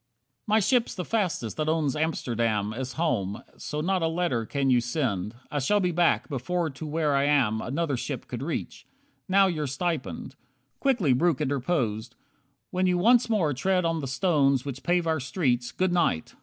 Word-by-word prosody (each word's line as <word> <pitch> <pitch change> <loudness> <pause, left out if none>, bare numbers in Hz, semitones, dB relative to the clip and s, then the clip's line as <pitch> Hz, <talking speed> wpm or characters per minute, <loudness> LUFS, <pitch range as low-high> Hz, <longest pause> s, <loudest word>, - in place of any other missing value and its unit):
20 215 - +3
My - - +5
ship's 240 +3 +1
the 180 -3 -4
fastest 180 - -1
that 155 0 0
owns 155 -4 +1
Amsterdam 115 -9 -1
As 130 +2 -5
home, 110 - -1
so 150 0 -4
not 185 +2 0
a 165 - +2
letter 160 -9 -1
can 135 -2 0
you 125 -1 +4
send. 120 - -2 0.2
I 145 - 0
shall 205 +10 +2
be 180 -2 +1
back, 160 -9 +2
before 155 +5 -2
to 150 +4 -7
where 150 -1 0
I 140 0 +2
am 130 -7 +2
Another 145 +1 -1
ship 120 - -5
could - - -5
reach. - - -5 0.4
Now 195 +1 +5
your 155 -6 -1
stipend 140 - -3 0.2
" 130 +1 -46
Quickly 230 - +2
Breuck 155 +2 +2
interposed. 125 -5 -1 0.6
"When 185 0 +1
you 180 -1 +2
once 235 +6 +4
more 180 -10 +2
Tread 180 +7 +1
on 165 -1 0
the 140 - -4
stones 140 -3 +2
which 135 -2 -5
pave 175 -1 +1
our 160 -1 +1
streets. 130 -3 -1
Good 185 -1 0
night! 165 - 0
150 Hz, 185 wpm, -27 LUFS, 125-175 Hz, 0.6 s, My